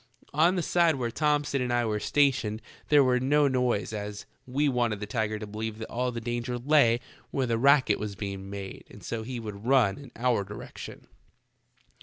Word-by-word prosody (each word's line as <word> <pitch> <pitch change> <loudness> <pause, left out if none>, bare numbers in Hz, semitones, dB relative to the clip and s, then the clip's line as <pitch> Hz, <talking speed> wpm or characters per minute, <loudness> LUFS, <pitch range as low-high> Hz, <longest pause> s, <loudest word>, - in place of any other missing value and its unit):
On 165 +5 +4
the 175 - 0
side 170 -1 +3
where 120 -3 -2
Thomson 145 -1 +1
and 125 -1 -1
I 120 -1 +2
were 105 -1 -1
stationed 120 -6 +1 0.2
there 145 -2 +6
was 125 -1 +2
no 145 +2 +3
noise, 125 -5 0
as 105 -1 -5 0.2
we. 140 +4 +1
wanted 120 -5 0
the 105 - -4
tiger 110 0 -1
to 105 - -6
believe 110 +1 -5
that 110 - -7
all 125 +1 -1
the 120 - -4
danger 120 +1 -3
lay 120 -3 +4 0.3
where 135 - -1
the 115 -2 0
racket 135 -4 +4
was 105 -1 -4
being 100 0 -5
made 100 -1 -7
and - - -14
so 115 -1 -3
he 120 +2 -5
would 105 0 -7
run 130 -4 +3
in 140 -4 -12
our 120 -4 +1
direction. 105 +1 -9
120 Hz, 195 wpm, -28 LUFS, 105-135 Hz, 0.3 s, there